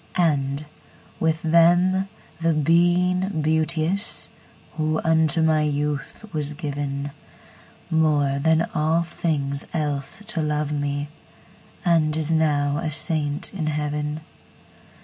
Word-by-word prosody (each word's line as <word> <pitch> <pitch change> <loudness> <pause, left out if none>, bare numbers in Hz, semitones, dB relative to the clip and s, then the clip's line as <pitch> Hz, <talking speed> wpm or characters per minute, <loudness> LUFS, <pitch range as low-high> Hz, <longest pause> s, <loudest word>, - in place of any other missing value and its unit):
And 145 -4 +1 0.5
with 160 0 0
them 175 +4 +4 0.3
the 165 -1 +1
Being 175 +3 +2
Beauteous, 160 +5 0 0.5
Who 155 0 0
unto 160 0 +2
my 155 -1 +3
youth 150 +4 -2
was 150 -1 -2
given, 145 -2 -4 0.8
More 150 -4 +2
than 160 +3 +2
all 160 +2 +2
things 145 -4 -2
else 145 +3 -2
to 195 -6 -2
love 150 -1 -1
me, 145 0 -2 0.8
And 160 -3 +3
is 160 0 0
now 145 -3 +2
a 165 0 -2
saint 155 -1 +1
in 165 -5 -3
heaven. 150 0 -2
155 Hz, 110 wpm, -23 LUFS, 145-165 Hz, 0.8 s, them